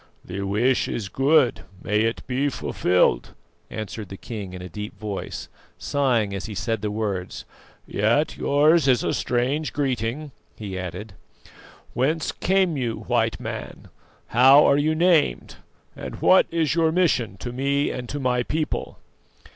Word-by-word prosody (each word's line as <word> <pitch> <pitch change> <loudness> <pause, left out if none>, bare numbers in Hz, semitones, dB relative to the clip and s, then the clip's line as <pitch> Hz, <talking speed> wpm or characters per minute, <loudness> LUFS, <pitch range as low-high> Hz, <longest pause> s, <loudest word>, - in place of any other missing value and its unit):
"The 95 +2 -5
wish 105 +7 +1
is 100 -4 -4
good, 135 0 +3 0.2
may 105 +1 +1
it 115 +1 -1
be 135 +3 0
fulfilled," 90 - +1 0.3
answered 110 -2 -6
the 95 - -8
king 100 -5 -7
in 90 - -7
a - - -6
deep 105 +5 -7
voice, 105 -3 -5 0.3
sighing 120 -8 0
as 100 - -4
he 105 - -7
said 115 +1 -2
the 105 - -2
words. 105 -4 -4 0.4
"Yet 115 +9 +1
yours 150 +1 +3
is 125 -3 +3
a - - 0
strange 130 +5 -1
greeting," 135 +1 -2 0.3
he 100 -3 -6
added. 95 +3 -6 0.8
"Whence 155 +6 0
came 185 -2 +1
you, 120 -5 -2
White 115 -2 0
Man, - - -7 0.4
how 135 +5 +7
are 140 - +4
you 155 +2 +1
named, 165 - +2 0.4
and - - -7
what 185 - +5
is 165 -3 0
your 165 -1 +2
mission 140 - +1
to 120 +5 -6
me 140 +2 0
and 125 -1 -6
to 145 - -4
my 125 -2 +1
people?" 155 +5 -3
125 Hz, 150 wpm, -24 LUFS, 105-145 Hz, 0.8 s, how